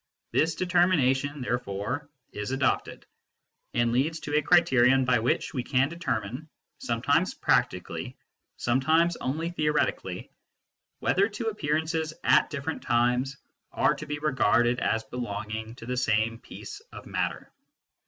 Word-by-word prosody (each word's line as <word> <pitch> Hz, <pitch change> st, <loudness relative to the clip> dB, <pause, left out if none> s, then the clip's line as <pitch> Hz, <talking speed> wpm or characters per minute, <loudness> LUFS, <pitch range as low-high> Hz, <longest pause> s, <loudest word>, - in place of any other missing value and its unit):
This 160 Hz, +1 st, +2 dB
determination, 150 Hz, -6 st, +2 dB
therefore, 125 Hz, +3 st, -3 dB, 0.2 s
is 105 Hz, 0 st, -5 dB
adopted, 135 Hz, 0 st, -1 dB, 0.7 s
and 120 Hz, 0 st, +2 dB
leads 150 Hz, +7 st, +1 dB
to 145 Hz, -, -3 dB
a 150 Hz, -, +4 dB
criterion 135 Hz, -6 st, +4 dB
by 125 Hz, -2 st, +3 dB
which 120 Hz, +2 st, 0 dB
we 130 Hz, -, -1 dB
can 135 Hz, +2 st, +1 dB
determine, 140 Hz, -, -4 dB, 0.3 s
some 115 Hz, -1 st, -3 dB
times 160 Hz, +7 st, +2 dB
practically, -, -, 0 dB, 0.4 s
sometimes 160 Hz, +8 st, +2 dB
only 160 Hz, +6 st, -2 dB
theoretically, 150 Hz, -3 st, -1 dB, 0.7 s
whether 200 Hz, +3 st, +2 dB
two 225 Hz, +2 st, -3 dB
appearances 160 Hz, -3 st, -1 dB
at -, -, +4 dB
different 150 Hz, +1 st, -4 dB
times 125 Hz, +3 st, +1 dB, 0.3 s
are -, -, +2 dB
to 155 Hz, -, -8 dB
be 150 Hz, 0 st, -3 dB
regarded 125 Hz, -4 st, +2 dB
as 110 Hz, 0 st, 0 dB
belonging 110 Hz, -1 st, -5 dB
to 115 Hz, -, -11 dB
the 125 Hz, +1 st, -3 dB
same 115 Hz, -1 st, +1 dB
piece 415 Hz, -, -9 dB
of -, -, -10 dB
matter. -, -, -3 dB
135 Hz, 130 wpm, -27 LUFS, 120-160 Hz, 0.7 s, a